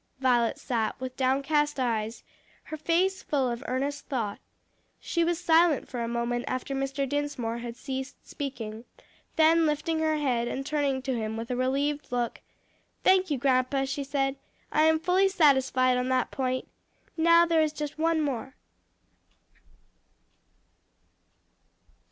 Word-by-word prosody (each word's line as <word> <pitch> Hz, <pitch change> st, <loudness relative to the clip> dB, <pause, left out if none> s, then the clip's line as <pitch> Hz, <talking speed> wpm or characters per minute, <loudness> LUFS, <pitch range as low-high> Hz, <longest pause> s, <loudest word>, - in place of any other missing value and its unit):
Violet 245 Hz, -3 st, +2 dB
sat 230 Hz, -4 st, -2 dB
with 255 Hz, 0 st, -6 dB
downcast 280 Hz, +3 st, +1 dB
eyes, 225 Hz, -3 st, -1 dB, 0.4 s
her 310 Hz, -, -7 dB
face 350 Hz, +5 st, +1 dB
full 270 Hz, -5 st, 0 dB
of 235 Hz, -, -5 dB
earnest 280 Hz, +3 st, -2 dB
thought. 225 Hz, -7 st, -3 dB, 0.6 s
She 340 Hz, -, 0 dB
was 340 Hz, 0 st, 0 dB
silent 335 Hz, -3 st, +3 dB
for 245 Hz, -, -5 dB
a 230 Hz, -, -2 dB
moment 235 Hz, +1 st, -2 dB
after 255 Hz, +2 st, -3 dB
Mr. 275 Hz, 0 st, -2 dB
Dinsmore 280 Hz, -5 st, -2 dB
had 235 Hz, -1 st, -6 dB
ceased 265 Hz, 0 st, -6 dB
speaking, 230 Hz, -5 st, -6 dB, 0.5 s
then 325 Hz, 0 st, +5 dB
lifting 305 Hz, +2 st, -1 dB
her 315 Hz, -1 st, +1 dB
head 245 Hz, -5 st, 0 dB
and 270 Hz, +2 st, -4 dB
turning 280 Hz, -3 st, 0 dB
to 265 Hz, -, -1 dB
him 220 Hz, -1 st, -3 dB
with 230 Hz, +2 st, -5 dB
a -, -, 0 dB
relieved 280 Hz, +3 st, -1 dB
look, 240 Hz, -1 st, -2 dB, 0.6 s
"Thank 375 Hz, -1 st, +4 dB
you, 290 Hz, -, 0 dB
grandpa," 260 Hz, +1 st, +1 dB
she 275 Hz, +1 st, -3 dB
said. 270 Hz, 0 st, -1 dB, 0.3 s
"I 310 Hz, -, +4 dB
am 320 Hz, 0 st, +4 dB
fully 370 Hz, +3 st, +3 dB
satisfied 265 Hz, -7 st, +3 dB
on 250 Hz, +1 st, -1 dB
that 255 Hz, -1 st, +1 dB
point. 255 Hz, -1 st, -2 dB, 0.5 s
Now, 335 Hz, +1 st, +5 dB
there 330 Hz, -1 st, +3 dB
is 310 Hz, -1 st, +1 dB
just 300 Hz, 0 st, -6 dB
one 325 Hz, 0 st, +2 dB
more. 265 Hz, -2 st, -3 dB
275 Hz, 145 wpm, -27 LUFS, 250-310 Hz, 0.6 s, then